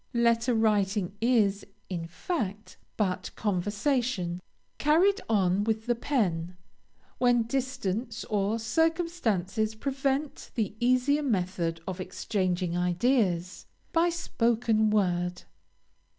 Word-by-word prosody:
Letter 235 +1 +3
writing 205 -3 +1
is, 215 -5 +3 0.2
in 170 -3 -4
fact, 210 - -4 0.2
but 190 -4 -1
conversation, 205 -1 -1 0.4
carried 345 +7 +4
on 195 -2 +2
with 220 0 -1
the 240 - +2
pen, 180 - -1 0.6
when 245 -2 +4
distance 250 -3 -2
or 210 +1 0
circumstances 230 - 0
prevent 275 +3 -2
the 215 -5 -1
easier 255 +4 +3
method 180 - -1
of 185 0 -4
exchanging 185 -2 -1
ideas, 180 0 +1 0.3
by 335 +1 +4
spoken 230 -9 +1
words. 180 -4 0
220 Hz, 95 wpm, -28 LUFS, 185-250 Hz, 0.6 s, carried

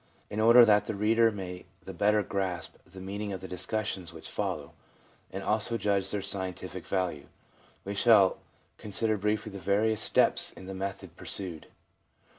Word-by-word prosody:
In 105 - -3
order 115 +2 +8
that 105 -2 +4
the 110 - -2
reader 115 +3 +4
may 90 -3 -7 0.2
the - - -7
better 105 0 +3
grasp 95 -5 -3
the 95 +2 -12
meaning 100 +2 -4
of 95 - -4
the 95 - -7
discussions 95 -1 -3
which 80 -1 -9
follow, - - -3 0.6
and 95 +1 -5
also 110 +3 0
judge 100 -3 +1
of - - -1
their 105 0 -2
scientific 95 -2 -5
value, 90 -7 -2 0.6
we 100 - -3
shall 100 -2 +5 0.4
consider 110 +1 -1
briefly 105 +1 -1
the 100 - -7
various 105 +4 +1
steps - - +2
in - - -11
the 95 - -6
method 95 0 -5
pursued. 90 -5 -4
100 Hz, 165 wpm, -29 LUFS, 95-105 Hz, 0.6 s, order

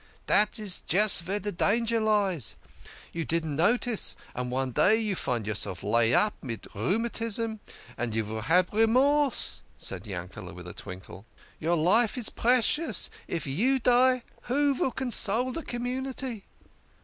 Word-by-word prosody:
" - - -34
Dat's 210 -2 +3
just 205 +1 +4
vere 190 +5 -2
de 205 0 -3
danger 230 +5 +1
lays. 200 - +1 0.6
You 165 - -2
don't 160 -2 -1
notice, 220 - +1 0.2
and 125 0 -3
one 130 +1 -1
day 200 - +4
you 215 -3 -1
find 120 - -2
yourself 100 -4 -2
laid 115 +2 +3
up 210 0 +3
mid 115 -5 -6
rheumatism, 225 - -1 0.4
and 115 -2 -2
you 110 - +1
vill 110 +1 -5
have 175 - +2
Remorse," 260 +5 +2 0.2
said 95 +1 -4
Yankele' 90 -1 -7
with 90 0 -10
a 90 - -7
twinkle. 95 +3 -10 0.3
"Your 170 +2 +1
life 210 +9 +3
is 235 -3 0
precious 255 +7 +1 0.2
if 165 - -3
you 220 - +2
die, 255 0 +3 0.3
who 285 +2 +3
vill 265 - 0
console 245 -1 0
de 330 - -4
com 240 -5 -5
munity? 255 -3 -4
205 Hz, 150 wpm, -28 LUFS, -, 0.6 s, just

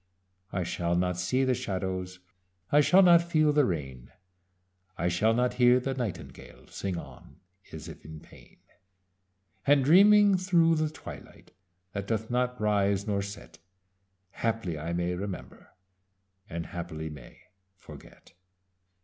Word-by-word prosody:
"I 90 - -2
shall 85 0 -2
not 90 0 0
see 125 +9 0
the 130 -1 +2
shadows. 95 -5 -4 0.5
I 150 - +6
shall 185 +6 +5
not 170 -2 +7
feel 155 -3 +2
the 145 -2 +4
rain. 65 -8 -5 0.9
I 85 - 0
shall 95 +6 +2
not 125 +1 +1
hear 125 +1 +6
the 135 +1 -3
nightingale 90 - -7
Sing 95 -3 -4
on, 85 - -12 0.3
as 80 0 -9
if 80 - -11
in 80 0 -10
pain: - - -18 1.1
And 140 -2 +4
dreaming 200 +4 +6
through 175 -3 +3
the 155 0 0
twilight 155 - -12 0.4
That 100 -1 -5
doth 110 0 -2
not 125 0 -1
rise 100 -2 +1
nor 100 -2 -1
set, 100 +2 -9 0.7
Haply 115 -7 -2
I 80 +3 -4
may 85 +1 -1
remember, 95 0 -7 0.8
And 85 0 -5
haply 80 -3 -6
may 70 -5 -13 0.3
forget." - - -15
100 Hz, 135 wpm, -28 LUFS, 90-135 Hz, 1.1 s, not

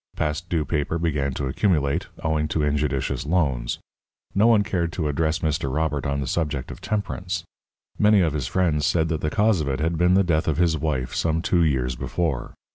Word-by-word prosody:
Past 75 +3 -2
due 80 -3 0
paper 75 +2 -1
began 75 -5 0
to 70 - -2
accumulate, 75 +1 +1 0.2
owing 80 -1 +1
to 75 0 -1
injudicious 75 -2 0
loans. 70 -7 0 0.6
No 105 +4 +4
one 110 -3 +5
cared 85 -4 -1
to 80 -2 -1
address 80 +2 0
Mr. 75 -3 0
Robert 75 -1 -1
on 70 0 -1
the - - -2
subject 75 -2 -2
of - - -10
temperance. 95 -4 -3 0.6
Many 105 -1 +5
of 80 -4 +1
his 70 -5 -2
friends 80 -4 +1
said 80 -2 +1
that 80 -2 -1
the 75 - 0
cause 105 -1 +2
of 75 - -3
it 65 - -1
had 80 +1 0
been 90 +1 +4
the 100 - +5
death 80 -3 +1
of 80 -3 +1
his 85 -2 +3
wife 65 -6 -2
some 80 -1 0
two 90 -1 +2
years 65 -5 +1
before. 75 +1 -2
80 Hz, 200 wpm, -24 LUFS, 70-85 Hz, 0.6 s, one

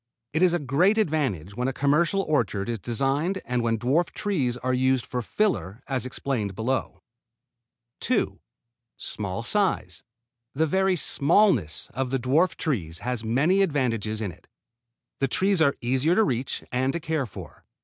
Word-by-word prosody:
It 160 - +1
is 180 -2 +5
a - - +3
great 170 +8 +2
advantage 135 - 0
when 125 +2 -1
a 135 - -1
commercial 165 +9 +2
orchard 120 - 0
is 115 -2 -2
designed 135 - 0
and 125 0 -1
when 115 -1 +1
dwarf 135 +10 +1
trees 140 - -1
are 130 +1 -1
used 130 0 +2
for 125 - -3
fillers 120 - -1
as 130 -3 -2
explained 120 -7 -3
below. 125 +5 -2 1.0
2. 250 -4 0 0.6
Small 100 +1 -4
size. 120 - 0 0.5
The 160 +3 +2
very 190 +4 +2
smallness 145 - +2
of 130 +1 -2
the 135 - 0
dwarf 150 +8 +2
trees 90 - -2
has 125 -2 -2
many 145 - +2
advantages 115 - 0
in 100 -4 -2
it. - - -19 0.7
The 135 - +2
trees 190 +6 +1
are 140 -3 +4
easier 130 +7 +2
to 220 - +5
reach 130 - -2
and 130 +2 +1
to 170 - -2
care 155 -4 -2
for. 100 - -11
135 Hz, 160 wpm, -25 LUFS, 120-165 Hz, 1.0 s, is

